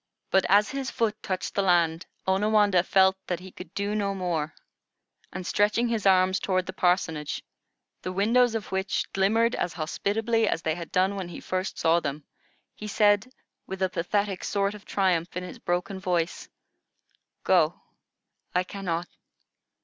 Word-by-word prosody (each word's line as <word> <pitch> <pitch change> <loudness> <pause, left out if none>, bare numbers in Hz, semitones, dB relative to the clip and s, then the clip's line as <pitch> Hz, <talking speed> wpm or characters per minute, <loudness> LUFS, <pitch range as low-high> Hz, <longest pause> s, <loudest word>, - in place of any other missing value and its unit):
But 190 -1 +3
as 205 +2 +5
his 270 -1 -3
foot 215 -2 -1
touched 185 -2 -3
the 200 - +1
land, 170 -3 +2 0.2
Onawandah 205 -1 +3
felt 190 0 +4
that 175 -2 -2
he 185 +1 -11
could 180 - -11
do 200 +1 -1
no 200 -2 -1
more, 165 -5 -2 0.8
and 185 -1 -6
stretching 210 +5 +2
his 220 -4 0
arms 185 0 +4
toward 185 -1 0
the 185 - -6
parsonage, 165 -5 0 0.6
the 185 - -4
windows 230 +5 +3
of 215 -4 -4
which 190 +1 -1
glimmered 225 +5 +2
as 175 - -2
hospitably 220 +7 0
as 165 - -1
they 160 - +1
had 170 0 -7
done 190 +2 +2
when 190 -3 -4
he 175 - -8
first 185 +1 -3
saw 165 +1 +3
them, 145 -1 -4 0.5
he 210 - -8
said, 205 +2 +3 0.4
with 190 0 -3
a 185 - +2
pathetic 195 +2 -1
sort 200 0 0
of 210 -1 -12
triumph 180 -3 0
in 180 - -3
his 180 - -9
broken 180 +2 -2
voice: 175 -2 -1 0.9
"Go. - - +3 0.8
I 180 - +3
cannot. 180 -3 -3
190 Hz, 160 wpm, -27 LUFS, 180-205 Hz, 0.9 s, as